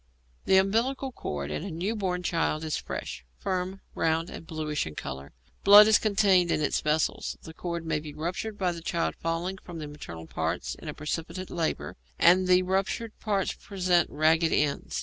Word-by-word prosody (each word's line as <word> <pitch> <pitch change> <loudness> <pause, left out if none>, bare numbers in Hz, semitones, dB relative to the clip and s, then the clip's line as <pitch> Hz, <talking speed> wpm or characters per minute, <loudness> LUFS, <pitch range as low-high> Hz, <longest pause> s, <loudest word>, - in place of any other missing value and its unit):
The 190 - +5
umbilical 235 +8 +1
cord 75 - -5
in 115 - -3
a 200 - -5
new 185 +7 -2
born 180 -4 -2
child 165 -2 0
is 155 -1 -1
fresh, - - -5
firm, 185 - -3
round, 165 +1 0
and 165 - -9
bluish 155 - -2
in 75 - -8
colour; 70 0 -6 0.3
blood 205 +1 +10
is 220 - +6
contained 195 -4 +3
in - - +2
its 150 - 0
vessels. 150 +1 0
The 160 - -9
cord 170 0 -4
may 155 -1 0
be 150 0 -8
ruptured 185 +7 -3
by 185 -3 +1
the 170 -1 -7
child 170 0 -1
falling 170 +3 -2
from 175 -2 -9
the 155 - -5
maternal 85 - -9
parts - - -2
in - - -11
a - - -5
precipitate 165 +4 -4
labour, 165 -2 -2 0.2
and 180 +2 +5
the 185 0 +5
ruptured 195 +4 -1
parts 200 -3 0
present 180 -4 +1
ragged 160 +2 +3
ends. 145 -1 0
170 Hz, 185 wpm, -28 LUFS, 155-190 Hz, 0.3 s, blood